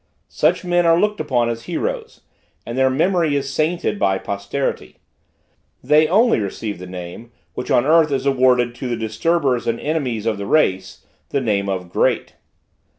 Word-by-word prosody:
Such - - +1
men 175 0 +2
are 165 0 +5
looked 210 +1 0
upon 125 -6 0
as 115 0 -5
heroes, 465 - -4 0.4
and 120 - -5
their 130 0 +3
memory 165 +2 +1
is 140 -1 -2
sainted 170 +7 -1
by 95 - +2
posterity. 100 +8 -4 0.9
They 150 +4 +4
only 220 - +3
receive 105 0 -4
the 90 - -8
name, 90 +6 -9 0.2
which 125 - -6
on 120 - +3
the 140 - -1
earth 160 -1 +5
is 135 -1 -1
awarded 125 -3 +3
to 125 +2 -6
the 120 - -2
disturbers 125 +4 0
and 115 0 -1
enemies 130 -8 -2
of 110 -3 -1
the 100 - -5
race 95 -11 0 0.2
the 140 - 0
name 100 -5 -1
of 90 -2 -4
great! - - 0
130 Hz, 170 wpm, -20 LUFS, 110-155 Hz, 0.9 s, are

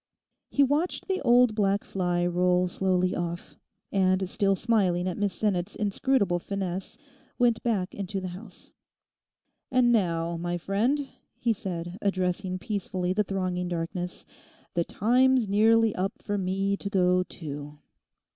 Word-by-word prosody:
He 280 - +3
watched 295 +6 0
the 380 -1 -1
old 245 -1 +5
black 200 -1 +1
fly 175 -2 -1
roll 180 +1 +2
slowly 185 0 +1
off, 175 0 -4 0.4
and 185 -1 +2
still 195 +1 +1
smiling 190 -5 +1
at 180 - -2
Miss 205 -1 0
Sinnet's 200 -2 -1
inscrutable 205 -2 +1
finesse 190 0 -4 0.4
went 240 -2 +3
back 200 -6 -1
into 195 0 -4
the 185 -1 -5
house. 185 +2 -11 1.0
'And 255 -2 +4
now, 170 -6 +1
my 175 +1 -2
friend,' 235 - 0 0.3
he 235 -1 +1
said, 180 -2 -5
addressing 185 -1 -1
peacefully 185 -3 -2
the 210 +2 +2
thronging 185 -2 -2
darkness, 175 +1 -4 0.5
'the 170 -1 0
time's 250 +1 +3
nearly 220 +2 +4
up 190 +2 -1
for 205 - -3
me 195 +1 0
to 200 - -5
go 180 -2 +3
too. 150 -4 -7
190 Hz, 135 wpm, -27 LUFS, 180-215 Hz, 1.0 s, old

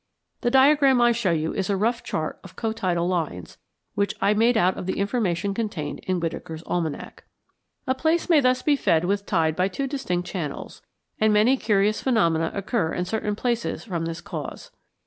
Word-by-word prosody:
The 240 - 0
diagram 270 0 +5
I 240 0 +5
show 230 -4 0
you 160 -1 0
is 195 -1 -2
a 200 - +1
rough 230 +4 0
chart 155 -1 -4
of - - -13
cotidal 185 -6 -1
lines, 155 - -3 0.3
which 200 0 -1
I 205 - +3
made 230 +2 +3
out 185 0 +3
of 180 - -6
the 190 - -2
information 200 -3 0
contained 195 -9 -4
in 185 -1 -2
Whitaker's 160 -1 -5
Almanac. 165 -4 -4 0.6
A 260 - +1
place 320 +5 0
may 330 -4 +5
thus 255 -2 +2
be 295 - +3
fed 165 - +2
with 200 +2 -1
tide 160 -4 +1
by 185 +2 +2
two 235 +8 -3
distinct 180 -11 -2
channels, 160 -8 -5 0.4
and 215 0 +4
many 215 +5 +4
curious 210 -3 +1
phenomena 165 -10 +2
occur 200 -4 -1
in 180 - -2
certain 210 +2 -2
places 235 +1 -2
from 170 -7 -3
this 165 0 -5
cause. - - -7
200 Hz, 185 wpm, -24 LUFS, 170-240 Hz, 0.6 s, diagram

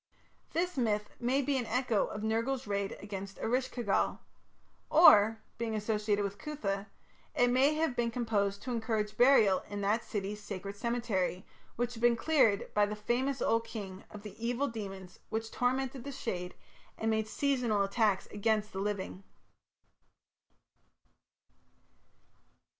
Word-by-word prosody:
This 355 0 -1
myth 210 -4 0
may 260 +3 +1
be 275 -1 +1
an 240 - -4
echo 250 -5 +1
of 210 - -6
Nergal's 230 +4 0
raid 200 -1 -2
against 195 -1 -7
Eresh 255 +3 0
ki 240 - -4
gal. 200 -3 +1 0.7
Or, 220 -9 +7 0.2
being 225 -2 -1
associated 210 -1 0
with 200 0 -4
Cuthah, 205 -10 -3 0.5
it 245 0 +4
may 270 +4 +4
have 315 -5 0
been 235 -1 +1
composed 205 -4 -1
to 255 - -4
encourage 220 -3 -1
burial 225 -7 +5
in 205 0 -4
that 210 +3 +1
city's 205 0 -4
sacred 200 -1 -6
cemetery, 220 -5 -1 0.3
which 245 0 -1
had 230 - -9
been 240 0 +5
cleared 230 -7 +2
by 205 -1 +3
the 210 - -4
famous 245 +5 -1
old 230 0 +1
king 195 -4 -7
of 210 -1 -10
the 210 -3 -8
evil 245 +4 0
demons 195 -5 -7
which 225 0 -3
tormented 260 0 -1
the 280 -1 -7
dead 180 -5 -3 0.4
and 225 0 0
made 220 0 0
seasonal 240 -3 +1
attacks 200 0 +1
against 215 0 0
the 190 - -4
living. 195 -1 -3
220 Hz, 145 wpm, -32 LUFS, 205-245 Hz, 0.7 s, Or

